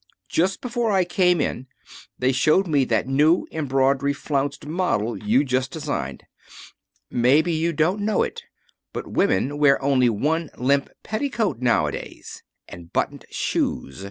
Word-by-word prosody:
Just 185 +4 0
before 240 -2 -1
I 190 -2 +3
came 180 -1 +2
in 130 -2 -2 0.5
they 130 +1 +2
showed 155 +9 +3
me 145 -6 +2
that 115 0 0
new 150 +6 +3
embroidery 140 -1 +1
flounced 140 0 -2
model 145 - -1
you 110 +6 +2
just 130 -1 -1
designed. - - -4 0.9
Maybe 145 +8 +3
you 165 +2 0
don't 170 +6 0
know 210 0 +1
it, - - -5 0.5
but - - -5
women 135 +10 +1
wear 140 -2 +5
only 135 -3 +3
one 150 +8 -1
limp 140 +2 +1
petticoat 215 - -2
nowadays. 100 - -2 0.3
And 85 -1 -12
buttoned - - -2
shoes. 70 +5 -2
140 Hz, 135 wpm, -23 LUFS, 130-170 Hz, 0.9 s, wear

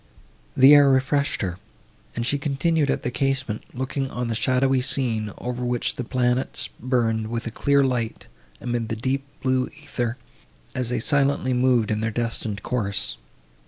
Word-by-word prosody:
The 135 +3 +8
air 145 -1 +7
refreshed 135 0 +1
her, 90 -1 -3 0.6
and 115 - -2
she 145 +3 0
continued 145 +1 +1
at - - 0
the 125 - -2
casement, 135 -5 -1
looking 130 +1 -3
on 125 -2 -3
the 115 - -1
shadowy 130 +2 +2
scene, 115 -5 +1
over 125 0 -4
which 120 -1 0
the 125 - -4
planets 125 +1 0
burned 115 -3 0
with 115 +1 -3
a 115 - -3
clear 140 +4 +2
light, 125 -4 -2 0.3
amid 120 -2 -2
the 115 - -1
deep 130 +4 -1 0.2
blue 130 -1 +1
æther, 125 -6 -4 0.6
as 125 -2 -1
they 125 -1 0
silently 140 +1 +2
moved 125 -3 +2
in 105 - 0
their 110 +1 0
destined 110 -2 -3
course. 100 -6 -2
125 Hz, 160 wpm, -24 LUFS, 115-135 Hz, 0.6 s, The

